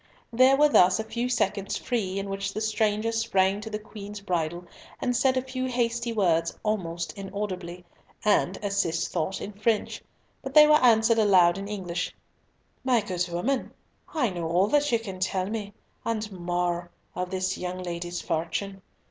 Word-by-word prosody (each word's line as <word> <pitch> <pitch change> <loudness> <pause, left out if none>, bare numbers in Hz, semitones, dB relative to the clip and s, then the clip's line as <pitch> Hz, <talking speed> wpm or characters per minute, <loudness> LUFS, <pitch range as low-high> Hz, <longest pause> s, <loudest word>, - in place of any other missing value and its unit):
There 260 +3 +6
were 300 +1 +6
thus 185 -8 +5
a - - -1
few 235 +3 -3
seconds 205 -4 0
free, 200 -6 -2
in 195 0 -3
which 195 0 -4
the - - -1
stranger 220 0 0
sprang 205 -3 +1
to 220 - -6
the 210 - -3
Queen's 210 -1 -9
bridle 175 -3 -2 0.3
and 245 - 0
said 260 +1 +3
a 255 - 0
few 260 0 -3
hasty 240 -1 -1
words 170 -6 +1
almost 175 -6 -2
inaudibly, 185 -3 -5 0.4
and 200 -3 +3
as 200 0 -1
Cis 165 -4 +1
thought, 185 +5 -2
in 210 - -6
French; 215 +1 -1 0.4
but 265 +1 -7
they 300 0 +10
were 300 -2 +5
answered 225 -1 +5
aloud 185 -4 +5
in 200 - -5
English—"My 205 +5 -4
good 180 -3 -2
woman, 245 +10 -1 0.4
I 260 - +1
know 170 -2 -3
all 180 +3 +3
that 290 +1 +2
you 230 - +4
can 195 -5 -7
tell 185 0 0
me, 210 -1 -4 0.3
and 220 -2 -2
more, 175 -1 -2 0.2
of 180 0 -3
this 185 0 -1
young 180 0 -4
lady's 175 0 -4
fortune. 195 +4 -3
200 Hz, 170 wpm, -27 LUFS, 180-230 Hz, 0.4 s, they